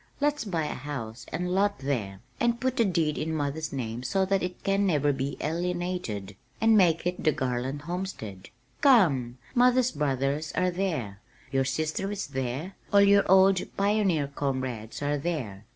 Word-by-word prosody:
Let's 295 -3 0
buy 170 -6 -1
a - - -3
house 125 -4 -6
and 180 +1 -2
lot 200 +2 +2
there 110 -9 -3 0.2
and 235 0 +1
put 260 0 -1
the 230 - +4
deed 165 -5 0
in 160 +1 -2
mother's 150 +1 -2
name 120 -3 -4
so 190 +10 +1
that 195 0 +1
it 180 0 -5
can 200 0 +2
never 145 -4 +2
be 135 +1 -3
alienated, 175 - -3 0.2
and 225 0 +5
make 170 -5 +4
it 180 0 -2
the 155 - +4
Garland 130 +2 -2
Homestead. 150 - -5 0.3
Come! 150 - +4 0.2
Mother's 250 0 +4
brothers 145 +1 -1
are 185 0 +1
there, 155 - -2 0.3
your 135 -1 +2
sister 155 +8 -2
is 205 -1 -3
there, 135 +8 -4 0.2
all 200 - +6
your 200 -1 +5
old 190 -1 +6 0.2
pioneer 200 -6 +2
comrades 130 -4 -3
are 145 0 0
there. 125 - -4
160 Hz, 165 wpm, -27 LUFS, 135-195 Hz, 0.3 s, all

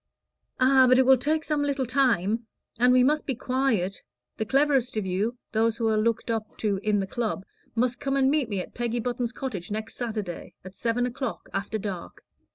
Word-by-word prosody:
"Ah, 260 0 +6
but 255 - +6
it 260 - +5
will 265 +1 +8
take 305 +5 0
some 300 -1 0
little 280 -2 0
time. 230 -4 +1 0.3
And 250 +1 +5
we 250 0 +6
must 300 +3 +2
be 270 - 0
quiet. 250 -7 0 0.4
The 220 - -2
cleverest 270 -2 +2
of 210 - -1
you 200 +6 -1
those 225 +1 +1
who 230 -1 0
are 220 - +2
looked 230 +2 0
up 220 -1 -4
to 205 -3 0
in 210 -1 +1
the 195 - -1
Club 210 -1 -3 0.3
must 250 +2 +1
come 275 -1 -1
and 265 0 +4
meet 290 -6 +1
me 200 -3 -1
at - - -10
Peggy 240 0 -2
Button's 240 0 -2
cottage 205 -12 -5
next 215 +1 -4
Saturday, 215 -7 -5
at 185 +1 -10
seven 240 +3 0
o'clock, 250 -1 -4
after 200 +3 -2
dark. 195 -4 -6
235 Hz, 200 wpm, -26 LUFS, 215-260 Hz, 0.4 s, will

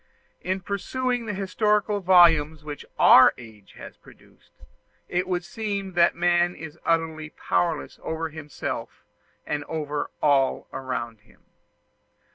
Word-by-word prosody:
In 185 +2 -2
perusing 245 +5 -2
the 210 - -2
historical 205 +2 0
volumes 165 -5 +4
which 150 -2 -8
our - - +7
age 110 -4 -14
has - - -12
produced, - - -21 0.6
it 180 +1 -1
would 180 -1 -1
seem 200 -1 -4
that 170 0 +3
man 175 0 +2
is 160 +1 -10
utterly 160 -2 -1
powerless 165 0 -2
over 160 0 -4
himself 150 -2 -7 0.4
and 150 -1 -3
over 150 -2 -4
all 140 -3 +2
around 120 -4 -5
him. 105 - -26
170 Hz, 120 wpm, -25 LUFS, 150-190 Hz, 0.6 s, our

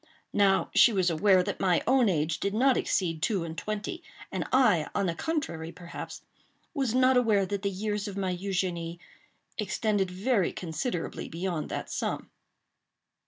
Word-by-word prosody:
Now 195 -1 +3
she 240 - +7
was 185 -4 +2
aware 185 +3 +4
that - - -4
my 180 -3 +2
own 255 -2 +4
age 155 -2 0
did 200 +1 -1
not 260 +3 +4
exceed 165 -4 0
two 195 -3 +1
and 160 -1 -6
twenty; 215 - -4 0.3
and - - -2
I, 220 - +4
on 200 - +1
the 170 - 0
contrary, 165 - -3
perhaps, 175 -1 -8 0.5
was 265 -6 0
not 255 0 +5
aware 215 -5 +3
that 200 0 -3
the 200 - 0
years 205 +2 -3
of 200 -1 -6
my 190 -2 -1
Eugénie 180 -3 -2 0.6
extended 205 -1 0
very 195 +1 +1
considerably 175 +2 -4
beyond 170 -1 -3
that - - -4
sum. - - -3
195 Hz, 160 wpm, -28 LUFS, 175-220 Hz, 0.6 s, she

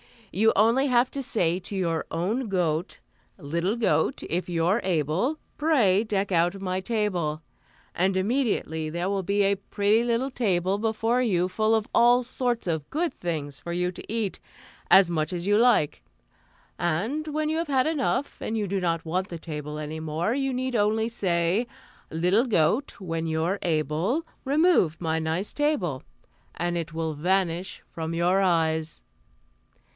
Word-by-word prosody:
You 215 +4 +2
have - - +5
only 230 +7 +4
to 255 +2 +2
say 185 -10 0
to 190 +2 -6
your 170 -4 -1
own 210 +10 -1
goat: 175 -3 -1 0.4
"'Little 170 +8 -1
goat, 240 +3 +1
if 180 +2 -3
you're 175 +5 +2
able, 180 - 0 0.2
Pray 235 -11 +3
deck 200 -2 -1
out 175 +2 +2
my 185 -1 -2
table,' 185 -8 -1 0.5
"and 185 +2 +1
immediately 190 - 0
there 175 +4 -2
will 200 -1 0
be 200 +2 +1
a 200 0 +3
pretty 205 +3 +1
little 240 +3 0
table 195 -5 0
before 225 +2 +1
you 180 -7 +1
full 215 +4 +2
of 220 -1 -1
all 245 +1 +5
sorts 245 -1 -2
of 160 -4 -2
good 330 +3 -1
things 150 -5 -4
for 170 - -6
you 180 +1 0
to 185 - -10
eat, 220 -4 -2 0.5
as 190 -2 +7
much 155 0 -1
as 175 0 -3
you 205 +1 +3
like. 230 -10 +3 0.8
And 210 - -1
when 305 0 -1
you 315 - 0
have 335 0 -1
had 265 -3 +2
enough, 290 -2 -1
and 225 - -2
you 210 - 0
do 195 +1 -1
not 165 -2 -1
want 185 +4 -1
the 170 - -6
table 150 -2 -6
any 155 +1 -5
more, 160 +6 -1
you 270 0 0
need 255 0 -2
only 220 +1 +2
say: 185 0 0 0.4
"'Little 180 +9 +2
goat, 210 - +1
when 165 -3 -3
you're 160 +5 0
able, 165 - 0 0.2
Remove 285 - +3
my 160 -1 -1
nice 160 +5 -2
table,' 210 - 0 0.5
"and 175 0 -1
it 165 -1 -4
will 160 -1 -2
vanish 180 +3 -1
from 165 0 -4
your 180 +3 +2
eyes." 160 -3 0
190 Hz, 160 wpm, -26 LUFS, 165-230 Hz, 0.8 s, as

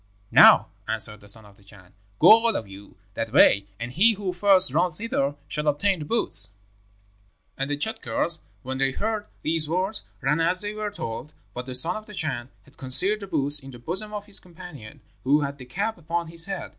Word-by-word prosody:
"'Now,' - - +6 0.2
answered 110 -1 -3
the 100 - -14
son 110 +1 -3
of 100 -1 -20
the 100 - -24
Chan, 100 -2 -19 0.2
'go - - +4
all 225 -1 +4
of 110 - -5
you 100 +1 -15 0.2
that 115 +1 -5
way, 100 0 +3
and 120 +1 -7
he 215 - +2
who 195 -3 -6
first 185 -5 +4
runs 170 0 +1
hither 145 -11 -3
shall 150 0 -5
obtain 180 +6 0
the 150 - -7
boots.' 100 - +2 1.0
"And 135 +1 -5
the 145 - -3
Tschadkurrs, 170 -3 0 0.2
when 130 +1 -6
they 135 0 0
heard 215 +2 -4 0.2
these 155 -1 0
words, 190 +5 -3 0.2
ran 145 +4 -1
as 170 +3 0
they 205 0 -5
were 215 0 -5
told; 150 - -8 0.2
but 125 +1 -8
the 130 - +1
son 165 +10 +7
of 215 - -12
the 210 - -12
Chan 130 -8 -5
had 140 - -24
concealed 140 +11 +6
the 200 - -10
boots 145 -3 0
in 135 - -13
the 125 - -12
bosom 185 - -4
of 205 -1 -7
his 205 -1 +3
companion, 170 -11 -14 0.2
who 145 +3 +1
had 140 0 -6
the 130 - -11
cap 200 - -5
upon 170 +1 -5
his 165 +2 0
head. 190 -4 -6
155 Hz, 210 wpm, -23 LUFS, 130-195 Hz, 1.0 s, son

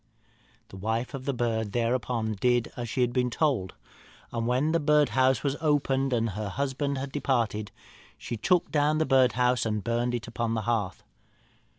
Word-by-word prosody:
"The 95 - -10
wife 110 +6 -2
of 135 -1 -6
the 140 - +1
bird, 110 -4 -1
thereupon, 120 -2 0
did 120 +3 +1
as 120 -2 -5
she 130 - -1
had 120 -1 +1
been 125 -1 +1
told; 120 - 0 0.6
and 115 0 -2
when 130 +6 +1
the 165 - +2
birdhouse 145 -4 +3
was 140 -1 0
opened, 135 -3 +1
and 115 -2 +1
her 105 +1 -4
husband 140 +4 -2
had 135 +1 -4
departed, 115 -7 -1 0.5
she - - -5
took 180 - +1
the 155 +1 +2
birdhouse 125 -2 +3
and 105 -2 -2
burnt 120 +2 0
it 115 -2 -5
upon 115 -1 -2
the 110 - -1
hearth. 110 -5 -2
125 Hz, 170 wpm, -27 LUFS, 115-135 Hz, 0.6 s, birdhouse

